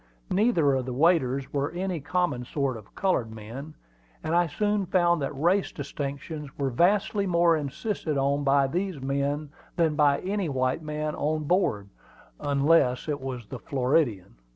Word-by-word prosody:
Neither 185 - +3
of 130 -1 -1
the 125 - -3
waiters 140 -4 +2
were 140 +1 0
any 180 +1 -3
common 175 -4 -1
sort 135 0 -2
of 110 -2 -13
colored 180 -12 +1
men; 120 +8 -8 0.5
and 160 - -2
I 175 0 +4
soon 205 +4 0
found 175 -3 +3
that 140 +1 -3
race 180 +5 +2
distinctions 145 +1 -5
were 135 -2 -1
vastly 195 - +2
more 170 -1 +4
insisted 155 - -3
on 140 +1 +1
by 140 0 +4
these 180 +3 -2
men 140 +2 -2 0.2
than 165 -3 +2
by 145 -2 +4
any 195 -2 -1
white 130 +2 0
man 150 0 -3
on 155 +1 -1
board, 145 - +1 0.5
unless 140 -2 +2
it 145 -2 -2
was 130 -3 -5
the 130 +3 -8
Floridian. 125 - 0
145 Hz, 155 wpm, -27 LUFS, 135-175 Hz, 0.5 s, I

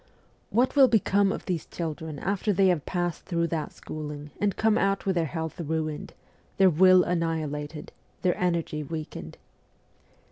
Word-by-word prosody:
What 245 +6 +2
will 275 -2 +8
become 200 -3 +3
of - - -5
these 175 -4 -2
children 160 -2 -5
after 200 +5 -1
they 195 -1 +4
have 170 -5 0
passed 175 -3 -2
through 170 -3 0
that 160 -3 -2
schooling 150 -1 -7
and 205 -2 +1
come 220 -1 +3
out 195 -2 +1
with 195 - +2
their 170 -2 +1
health 160 +2 -4
ruined, 155 -1 -3 0.4
their 190 -1 +6
will 185 +3 +6
annihilated, 155 -3 -2 0.3
their 180 -2 +3
energy 170 -4 -1
weakened 150 - -6
170 Hz, 150 wpm, -27 LUFS, 155-190 Hz, 0.4 s, will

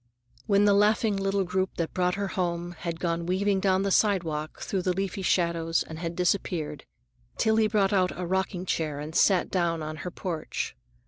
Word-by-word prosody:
When 200 -1 +4
the 205 - +5
laughing 210 +1 +3
little 195 0 0
group 185 +1 -1
that 165 -1 -3
brought 180 -1 +1
her 200 -1 -2
home 175 -2 -2
had 170 -1 -5
gone 170 -1 -1
weaving 195 +2 +1
down 190 0 +2
the 200 - 0
sidewalk 165 -8 +1
through 195 - -2
the 180 0 0
leafy 195 +1 -3
shadows 170 -3 +1
and 160 0 -9
had 170 0 -4
disappeared, 170 -4 -1 0.5
Tillie 220 0 +3
brought 205 -2 +2
out 185 -2 +3
a 180 - -2
rocking 185 0 -1
chair 155 -5 -1
and 150 +2 -6
sat 190 -3 +3
down 170 -3 0
on 155 0 -5
her 180 - -5
porch. 170 - -4
180 Hz, 185 wpm, -27 LUFS, 170-195 Hz, 0.5 s, the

